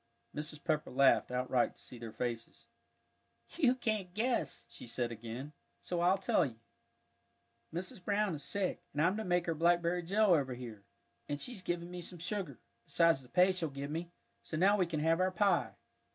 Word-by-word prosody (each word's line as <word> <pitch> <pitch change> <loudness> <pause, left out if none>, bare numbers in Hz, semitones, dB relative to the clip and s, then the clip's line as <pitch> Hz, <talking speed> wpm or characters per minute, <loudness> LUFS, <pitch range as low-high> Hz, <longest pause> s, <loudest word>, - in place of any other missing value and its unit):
Mrs. 150 0 -5
Pepper 155 -3 0
laughed 135 +1 +4
outright 125 0 +1
to - - -18
see 125 - -10
their 115 -1 -7
faces. 115 0 -4 0.9
"You 265 -7 +4
can't 215 -7 -1
guess," 225 - 0
she - - -9
said 120 0 -1
again, 120 +6 -6 0.3
"so 175 -1 -2
I'll 180 +3 +4
tell 185 -1 +2
you. 125 -7 -4 1.1
Mrs. 185 +4 -5
Brown 205 -1 +1
is 150 - -5
sick, 200 +2 -1
and 150 - 0
I'm 185 +4 +3
to 220 - -2
make 180 -2 +1
her 165 - 0
blackberry 170 +2 +2
jell 200 +3 +4
over 135 -6 +1
here; 115 -5 -8 0.5
and 145 - -2
she's 245 -1 -4
given 175 0 -3
me 180 0 -5
some 175 +1 -6
sugar, 170 - -3 0.3
besides 165 -4 +4
the 125 - -16
pay 180 +4 +5
she'll 180 -4 -1
give 140 +1 -5
me, 165 +2 -3 0.3
so 155 - -5
now 195 +5 +5
we 185 -4 +2
can 155 -3 -2
have 165 +2 +3
our 185 0 +3
pie." 185 0 +2
170 Hz, 185 wpm, -34 LUFS, 140-185 Hz, 1.1 s, pay